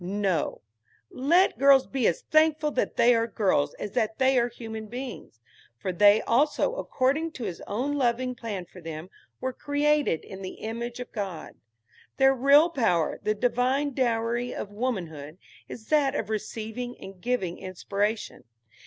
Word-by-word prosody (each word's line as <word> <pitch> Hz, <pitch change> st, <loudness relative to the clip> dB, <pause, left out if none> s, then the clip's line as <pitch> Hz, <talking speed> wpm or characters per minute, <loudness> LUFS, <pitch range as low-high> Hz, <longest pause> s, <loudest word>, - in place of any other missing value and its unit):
No; 190 Hz, -3 st, -1 dB, 0.5 s
let 325 Hz, +1 st, +3 dB
girls 275 Hz, -1 st, +6 dB
be 260 Hz, -5 st, 0 dB
as 165 Hz, -, 0 dB
thankful 310 Hz, -1 st, +3 dB
that 260 Hz, -, -1 dB
they 245 Hz, +1 st, +6 dB
are 230 Hz, 0 st, +1 dB
girls 185 Hz, -10 st, +1 dB
as 205 Hz, -, -6 dB
that 220 Hz, +1 st, -1 dB
they 265 Hz, -1 st, +4 dB
are 240 Hz, -, +2 dB
human 220 Hz, -2 st, -7 dB
beings; 245 Hz, -, -8 dB, 0.4 s
for 185 Hz, +10 st, -3 dB
they 205 Hz, +4 st, +5 dB
also, 295 Hz, -, +2 dB
according 310 Hz, -, 0 dB
to 250 Hz, -, -7 dB
his 185 Hz, -5 st, -5 dB
own 250 Hz, +8 st, -1 dB
loving 250 Hz, -1 st, 0 dB
plan 220 Hz, -7 st, -5 dB
for 180 Hz, +1 st, -14 dB
them, 165 Hz, +2 st, -7 dB, 0.3 s
were 260 Hz, 0 st, -3 dB
created 290 Hz, -, +1 dB
in 195 Hz, 0 st, -9 dB
the 185 Hz, -, -6 dB
image 235 Hz, +2 st, -5 dB
of 250 Hz, -, -7 dB
God. 195 Hz, -7 st, -5 dB, 0.6 s
Their 270 Hz, 0 st, +5 dB
real 280 Hz, +6 st, +5 dB
power, 180 Hz, -, +1 dB
the 215 Hz, -, 0 dB
divine 255 Hz, +5 st, +1 dB
dowry 240 Hz, -1 st, 0 dB
of 205 Hz, -, -5 dB
womanhood, 175 Hz, -, -4 dB, 0.3 s
is 220 Hz, -, -10 dB
that 290 Hz, -3 st, +3 dB
of 220 Hz, -6 st, -3 dB
receiving 225 Hz, +3 st, -4 dB
and 190 Hz, -1 st, -11 dB
giving 215 Hz, -8 st, -2 dB
inspiration. 200 Hz, +4 st, -3 dB
235 Hz, 155 wpm, -27 LUFS, 200-265 Hz, 0.6 s, girls